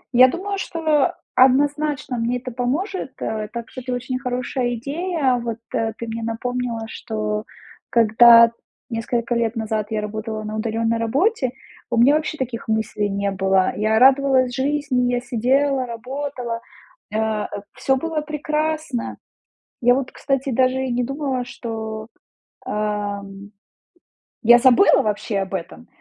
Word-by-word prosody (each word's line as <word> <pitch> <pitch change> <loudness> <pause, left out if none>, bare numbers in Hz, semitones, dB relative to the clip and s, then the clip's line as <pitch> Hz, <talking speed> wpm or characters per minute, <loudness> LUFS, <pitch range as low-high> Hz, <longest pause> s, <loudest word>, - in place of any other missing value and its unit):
Я 255 +1 +9
думаю, 390 +8 -3
что 310 -6 +1 0.2
однозначно 285 +1 +2
мне 235 +2 0
это 255 +1 -7
поможет, 275 - -2
э, 215 -1 -3
так 235 0 -6
что 255 - -8
это 250 0 -4
очень 255 +1 -3
хорошая 250 -1 -2
идея. 280 +1 0
Вот, 230 -1 -3 0.2
э, 225 -1 0
ты 235 - -6
мне 225 0 -4
напомнила, 230 +1 -3
что 215 -1 -3 0.4
когда 230 +1 +7 0.4
несколько 235 +1 -1
лет 235 -1 0
назад 220 -2 -2
я 215 -1 -1
работала 215 +1 -4
на 215 0 -5
удалённой 225 +1 0
работе, 275 - +1 0.4
у 240 - -1
меня 245 +5 +6
вообще 310 0 -2
таких 245 -3 -4
мыслей 220 -1 -1
не 200 0 -1
было. 190 0 +2
Я 215 +1 +1
радовалась 265 0 +5
жизни, 265 -2 0
я 245 - +1
сидела, 255 +2 +1
работала, 245 0 -5 0.5
э, 220 -1 0 0.3
всё 265 - +1
было 320 +2 -2
прекрасно. 305 -3 -2 0.6
Я 245 +1 +5
вот, 265 -1 -2
кстати, 275 -1 -1
даже 255 +2 +2
и 260 - -2
не 245 - 0
думала, 270 -1 -2
что, 220 -2 -6 0.6
эм, 205 -1 -3 0.9
я 240 +2 +8
забыла 250 -1 +6
вообще 210 -1 -1
об 195 0 -4
этом. 85 - -6
245 Hz, 140 wpm, -21 LUFS, 220-270 Hz, 0.9 s, Я